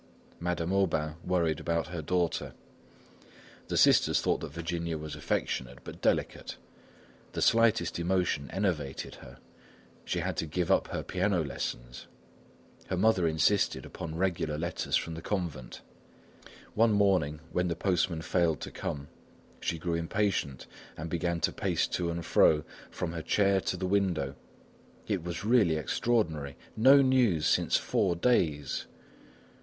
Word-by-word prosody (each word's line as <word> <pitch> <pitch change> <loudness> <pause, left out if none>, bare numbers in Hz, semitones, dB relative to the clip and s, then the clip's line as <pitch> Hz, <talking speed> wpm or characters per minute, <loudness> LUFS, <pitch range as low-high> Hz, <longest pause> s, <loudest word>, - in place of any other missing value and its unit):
Madame 85 0 -2
Aubain 80 -6 +1
worried 85 -4 +1
about 85 -2 -1
her 85 -2 -4
daughter. 90 +2 -1 1.1
The - - -1
sisters - - +5
thought - - +1
that - - -6
Virginia 85 0 -3
was 75 -1 -6
affectionate 60 -1 -2
but - - -10
delicate. - - -1 0.8
The - - -3
slightest 115 -7 +3
emotion 85 -5 0
enervated 85 -8 -2
her. 60 +2 -12 0.7
She - - -2
had - - -3
to 80 - -1
give 85 +2 -1
up - - +3
her - - -4
piano 95 -2 0
lessons. - - -5 0.8
Her 95 - -2
mother 95 -3 +3
insisted 80 +6 +1
upon 80 -1 -7
regular 85 -5 -1
letters 85 +2 -2
from 85 - -1
the 80 - -7
convent. 85 -11 -4 0.9
One 115 0 +4
morning, 95 -7 +2
when 90 0 0
the 85 - -1
postman 85 -2 0
failed 85 -6 +1
to - - -6
come, 70 0 -5 0.5
she 85 - -2
grew 85 +2 -2
impatient 85 -4 -1 0.3
and 80 +1 -6
began 85 0 -1
to - - +1
pace - - 0
to 85 -1 -1
and 85 -1 -4
fro, 75 -1 +4 0.3
from 85 - -4
her 85 -1 -4
chair 100 +3 +2
to 90 - -2
the 95 - -3
window. 90 -8 0 0.7
It 100 -5 -1
was 85 +3 -5
really 110 -8 +4
extraordinary! 80 - -1 0.2
No 135 +5 +7
news 120 - +3
since - - +3
four 90 -3 0
days! 85 - +1
85 Hz, 140 wpm, -30 LUFS, 80-95 Hz, 1.1 s, No